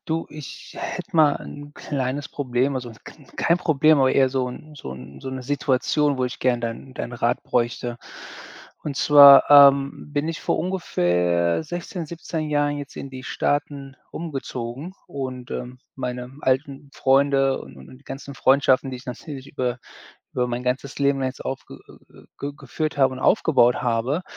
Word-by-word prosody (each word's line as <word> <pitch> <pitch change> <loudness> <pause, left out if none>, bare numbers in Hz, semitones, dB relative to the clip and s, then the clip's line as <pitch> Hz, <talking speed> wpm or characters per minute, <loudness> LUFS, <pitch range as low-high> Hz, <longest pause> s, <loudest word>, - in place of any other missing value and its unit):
du, 165 +1 -2
ich 150 -3 -10
hätte - - -5
mal 150 -2 +5
ein 145 0 -10
kleines 135 0 -3
Problem, 130 0 -1
also, 125 -3 -5
kn 145 -3 -14
kein 170 - +3
Problem, 155 -3 +4
aber 130 -1 +4
eher 135 -1 +4
so 130 -1 -1
'n 150 +5 -10
so 135 - -8
'n 65 +1 -11
so - - -6
'ne 130 -1 -5
Situation, 140 +2 +1
wo 130 - +1
ich 125 0 -5
gerne 125 -2 +1
deinen 120 +3 -6
deinen 120 - -5
Rat 120 0 0
bräuchte. 120 0 -1 0.8
Und 145 -2 -4
zwar, 140 -1 +8
ähm, 140 0 +6
bin 145 +2 -1
ich 165 - -4
vor - - 0
ungefähr 90 - +1
16, 175 +1 -5
17 160 -1 -5
Jahren 145 -1 +1
jetzt 145 0 -9
in 140 - -7
die 130 -1 -9
Staaten 145 -2 -2 0.2
umgezogen 140 0 -5
und, 130 -3 -6
ähm, 125 +1 -6 0.2
meine 125 -1 -4
alten 135 +1 -1
Freunde 135 0 +3
und 70 0 -12
und 65 - -13
die 140 - -26
ganzen 140 +1 -8
Freundschaften, 135 0 +3
die 130 - -5
ich 125 - -14
natürlich 135 +2 -8
über 125 -2 -2 0.5
über 125 -1 0
mein 120 0 -3
ganzes 130 +2 -3
Leben 140 -1 +2
jetzt 130 0 -4
aufge 135 0 -6
äh, - - -19
äh, - - -16
g 140 +1 -4
geführt 155 0 -4
habe 135 -2 +3
und - - -8
aufgebaut 135 - +4
habe, 125 +7 0
135 Hz, 170 wpm, -23 LUFS, 125-145 Hz, 0.8 s, zwar